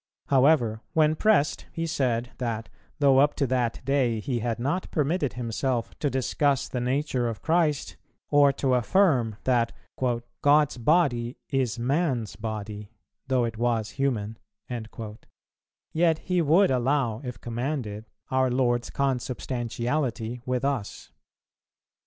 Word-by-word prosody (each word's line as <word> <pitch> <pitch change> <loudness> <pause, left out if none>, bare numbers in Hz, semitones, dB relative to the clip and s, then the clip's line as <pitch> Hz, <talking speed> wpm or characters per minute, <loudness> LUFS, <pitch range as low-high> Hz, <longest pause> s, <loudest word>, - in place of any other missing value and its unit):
However, 130 -5 +3
when 155 -2 +3
pressed, 190 -4 +2
he 165 - -3
said, 125 -6 -1
that, 115 -3 -3 0.3
though 140 -2 +5
up 145 +1 +4
to 140 - +1
that 125 -3 -1
day 130 -5 +1
he 120 +2 -2
had 115 0 -2
not 140 +10 -2
permitted 150 -1 0
himself 120 0 -2
to 145 - +1
discuss 135 +1 +1
the 125 - -3
nature 130 -1 0
of 110 -3 -7
Christ, 160 -3 +1 0.3
or 145 -1 +6
to 135 -1 0
affirm 125 - +3
that 120 -3 +2 0.7
"God's 145 -1 +4
body 125 -4 +2
is 130 -6 0
man's 130 - 0
body 105 -1 -5 0.4
though 130 -2 +2
it 115 -1 -5
was 115 -3 0
human," 115 -6 -2 1.5
yet 165 -1 +3
he 180 +1 0
would 165 +3 +4
allow, 125 -2 +1
if 125 -2 -6
commanded, 120 -3 -4 0.3
our 130 0 +3
Lord's 120 -1 +1
consubstantiality 125 -2 -2
with 125 +1 0
us. 135 -8 -3
130 Hz, 125 wpm, -26 LUFS, 115-145 Hz, 1.5 s, or